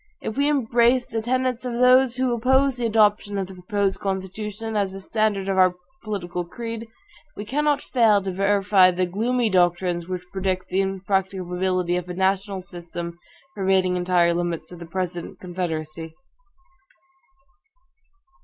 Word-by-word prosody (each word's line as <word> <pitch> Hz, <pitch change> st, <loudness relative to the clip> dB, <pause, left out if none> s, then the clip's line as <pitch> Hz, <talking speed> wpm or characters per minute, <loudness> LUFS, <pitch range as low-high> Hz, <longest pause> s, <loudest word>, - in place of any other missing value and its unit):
If 220 Hz, -, -5 dB
we 285 Hz, +2 st, +2 dB
embrace 245 Hz, -2 st, +3 dB
the 225 Hz, -, -3 dB
tenets 255 Hz, +1 st, -1 dB
of 250 Hz, -1 st, -3 dB
those 250 Hz, +1 st, +5 dB
who 255 Hz, -1 st, +1 dB
oppose 265 Hz, +3 st, +2 dB
the 240 Hz, -1 st, 0 dB
adoption 210 Hz, -2 st, +2 dB
of 195 Hz, -, -1 dB
the 190 Hz, -, -11 dB
proposed 195 Hz, +2 st, -1 dB
Constitution, 205 Hz, +3 st, -4 dB
as 200 Hz, -2 st, 0 dB
the 195 Hz, -, -6 dB
standard 205 Hz, -1 st, 0 dB
of 190 Hz, -1 st, +1 dB
our 185 Hz, -1 st, +5 dB, 0.3 s
political 180 Hz, -5 st, -4 dB
creed, 230 Hz, +5 st, -6 dB, 0.5 s
we 205 Hz, -, -6 dB
cannot 290 Hz, +4 st, +1 dB
fail 225 Hz, -5 st, +4 dB
to 195 Hz, -1 st, -4 dB
verify 195 Hz, 0 st, +4 dB
the 185 Hz, 0 st, 0 dB
gloomy 230 Hz, +6 st, 0 dB
doctrines 175 Hz, -1 st, +1 dB
which 180 Hz, -1 st, -4 dB
predict 190 Hz, -1 st, -2 dB
the 190 Hz, -, +1 dB
impracticability 185 Hz, -2 st, -1 dB
of 180 Hz, 0 st, -5 dB
a 180 Hz, -, -5 dB
national 190 Hz, +1 st, 0 dB
system 170 Hz, -1 st, -7 dB, 0.4 s
pervading 190 Hz, -2 st, +2 dB
entire 175 Hz, -1 st, +2 dB
limits 175 Hz, -1 st, -3 dB
of 175 Hz, -, -10 dB
the 170 Hz, -, -9 dB
present 175 Hz, -1 st, -4 dB
Confederacy. 165 Hz, -3 st, -4 dB
195 Hz, 145 wpm, -23 LUFS, 180-225 Hz, 0.5 s, those